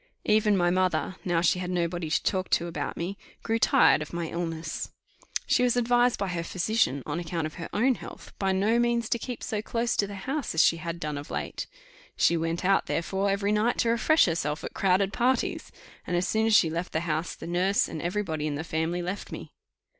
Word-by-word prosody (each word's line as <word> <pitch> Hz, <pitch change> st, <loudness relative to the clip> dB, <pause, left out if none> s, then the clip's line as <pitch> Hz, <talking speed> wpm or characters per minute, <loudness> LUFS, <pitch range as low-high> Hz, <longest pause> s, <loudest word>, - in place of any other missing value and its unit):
Even 210 Hz, -1 st, +3 dB
my 175 Hz, -1 st, +3 dB
mother, 185 Hz, 0 st, 0 dB
now 175 Hz, -2 st, +1 dB
she 180 Hz, +2 st, +2 dB
had 180 Hz, -1 st, -4 dB
nobody 175 Hz, -2 st, -1 dB
to -, -, +1 dB
talk 185 Hz, -1 st, 0 dB
to 170 Hz, -, +2 dB
about 170 Hz, 0 st, -4 dB
me, 185 Hz, +4 st, -4 dB, 0.2 s
grew 225 Hz, 0 st, 0 dB
tired 155 Hz, -, +5 dB
of 150 Hz, -, -7 dB
my 170 Hz, -1 st, -3 dB
illness. 165 Hz, -2 st, -4 dB, 0.6 s
She -, -, +2 dB
was 245 Hz, -1 st, +2 dB
advised 245 Hz, 0 st, +3 dB
by 200 Hz, -1 st, -2 dB
her 170 Hz, -1 st, -2 dB
physician, 175 Hz, -, 0 dB
on 170 Hz, -, -3 dB
account 170 Hz, -1 st, -3 dB
of 155 Hz, -, -5 dB
her 165 Hz, -, -5 dB
own 250 Hz, +6 st, +3 dB
health, -, -, -10 dB
by 195 Hz, -1 st, +1 dB
no 205 Hz, +5 st, +2 dB
means 235 Hz, -1 st, +1 dB
to 235 Hz, -, 0 dB
keep 245 Hz, 0 st, -6 dB
so 215 Hz, -1 st, -2 dB
close 230 Hz, +1 st, -1 dB
to 200 Hz, -, +2 dB
the 200 Hz, -, -7 dB
house 275 Hz, -, -2 dB
as 160 Hz, -, +6 dB
she 165 Hz, -, +4 dB
had 170 Hz, +1 st, -5 dB
done 150 Hz, -3 st, -3 dB
of 145 Hz, -, -10 dB
late: -, -, -4 dB, 0.5 s
she 170 Hz, -, +4 dB
went 165 Hz, +2 st, -2 dB
out 195 Hz, +1 st, +3 dB
therefore 195 Hz, +4 st, -1 dB
every 200 Hz, +1 st, 0 dB
night 215 Hz, +3 st, +2 dB
to 230 Hz, -, +2 dB
refresh 275 Hz, +7 st, +4 dB
herself 160 Hz, -3 st, -1 dB
at -, -, -6 dB
crowded 190 Hz, +1 st, +2 dB
parties; 255 Hz, +2 st, 0 dB, 0.4 s
and 175 Hz, -, 0 dB
as 180 Hz, -, 0 dB
soon 220 Hz, 0 st, +1 dB
as 220 Hz, -, +4 dB
she 165 Hz, -4 st, +5 dB
left 170 Hz, +3 st, -4 dB
the 160 Hz, -, 0 dB
house, 165 Hz, 0 st, -2 dB
the -, -, -9 dB
nurse 180 Hz, +4 st, +1 dB
and 155 Hz, -, -6 dB
every 200 Hz, +5 st, -1 dB
body 155 Hz, -4 st, -3 dB
in 145 Hz, -, -2 dB
the 155 Hz, -, -3 dB
family 165 Hz, +2 st, -2 dB
left 180 Hz, +3 st, -5 dB
me. -, -, -8 dB
180 Hz, 225 wpm, -27 LUFS, 165-215 Hz, 0.6 s, as